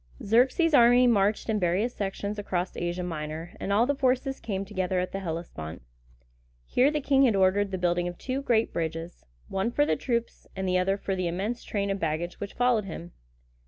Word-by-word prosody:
Xerxes' 255 - +3
army 245 -1 +7
marched 210 -3 +2
in 220 -2 +1
various 190 +7 +1
sections 200 +1 -3
across 185 -3 -2
Asia 175 +1 -2
Minor, 160 0 -5
and 200 - -3
all 215 +4 +4
the 285 - +1
forces 270 0 0
came 195 -2 -3
together 185 -2 -1
at 180 - -2
the 195 - -3
Hellespont. 160 - -6 0.8
Here 255 - +3
the 300 0 -1
king 270 0 +3
had 230 -5 +3
ordered 195 +1 +3
the 190 - -3
building 175 0 +1
of 175 0 -6
two 260 +1 -3
great 230 -5 +1
bridges, 165 +1 -4 0.2
one 195 +4 -1
for 290 +5 +2
the - - +1
troops, 235 -2 -3
and 190 0 -2
the 185 0 +2
other 195 +2 +1
for 195 -1 -2
the 185 -1 -1
immense 200 +8 -3
train 200 -1 -2
of 195 - -2
baggage 165 +2 -2
which 200 - -6
followed 245 -4 +2
him. 175 -1 -7
195 Hz, 195 wpm, -27 LUFS, 175-235 Hz, 0.8 s, army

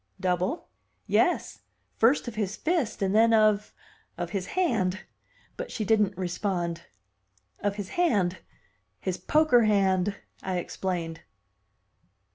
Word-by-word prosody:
"Double?" 185 - -1 0.4
"Yes, - - +1 0.4
first 245 +4 +3
of 240 - -4
his 210 -2 -2
fist 315 - -1
and 195 0 +1
then 225 +1 +5
of 215 -1 +3 0.5
of 175 -1 -4
his 190 -1 -3
hand!" 205 - +1 0.6
But - - -5
she 215 - -3
didn't 205 -3 +2
respond. 175 -2 -2 0.7
"Of 205 -1 -1
his 205 -2 -5
hand 200 - +1 0.6
his 185 -2 -3
poker 300 -7 +4
hand," 195 -2 +2 0.3
I 185 -1 -2
explained. 175 -2 -3
200 Hz, 115 wpm, -27 LUFS, 185-225 Hz, 0.7 s, then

